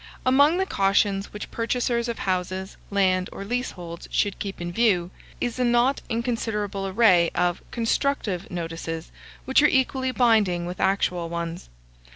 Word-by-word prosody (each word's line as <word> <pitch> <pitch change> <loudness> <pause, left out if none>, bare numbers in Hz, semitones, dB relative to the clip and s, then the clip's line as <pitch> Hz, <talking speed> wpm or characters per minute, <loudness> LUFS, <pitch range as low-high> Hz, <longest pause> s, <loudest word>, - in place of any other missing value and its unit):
Among 285 +6 +5
the 380 - +1
cautions 195 - +1
which 210 - -7
purchasers 235 0 0
of 235 - -3
houses, 185 +1 -2
land, 185 -2 +2
or 195 - -7
leaseholds, 180 -8 -4
should 205 -2 0
keep 200 -1 -5
in 175 0 -4
view, 180 -4 +2 0.3
is 245 0 -2
a - - +2
not 240 +3 +2
inconsiderable 225 -4 -2
array 185 -4 +4
of 175 0 +1
constructive 225 -5 -1
notices, 165 -1 -5 0.3
which 265 +2 +4
are 295 - +6
equally 265 -1 +1
binding 215 -9 +2
with 180 +1 -6
actual 180 -3 +1
ones. 170 - -5
200 Hz, 145 wpm, -25 LUFS, 180-240 Hz, 0.3 s, are